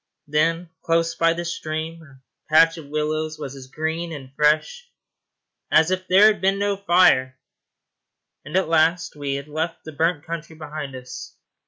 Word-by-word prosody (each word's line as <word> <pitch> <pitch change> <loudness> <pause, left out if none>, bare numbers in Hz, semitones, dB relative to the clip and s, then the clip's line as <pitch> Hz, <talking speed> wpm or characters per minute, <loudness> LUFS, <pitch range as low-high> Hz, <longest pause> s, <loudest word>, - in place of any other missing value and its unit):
Then, 165 +3 0
close 165 0 +1
by 165 0 +2
the 170 +1 -5
stream, 160 0 -4
a 140 -4 -17 0.3
patch 165 +1 +6
of 150 - -11
willows 155 +1 -2
was 140 -3 -7
as 130 -1 -11
green 160 +4 -3
and 135 -4 -9
fresh 155 - +1 0.8
as 160 +3 +4
if 185 0 -2
there 190 +3 +6
had 210 -3 +4
been 195 +1 +2
no 200 0 0
fire; 175 -10 +3 1.1
and 150 - -8
at 190 - +1
last 165 +1 +2
we 140 -2 -3
had 140 +1 -6
left 160 +2 -4
the 155 - -8
burnt 160 0 0
country 165 -1 -6
behind 150 -3 -7
us. 125 0 -9
160 Hz, 165 wpm, -23 LUFS, 150-170 Hz, 1.1 s, patch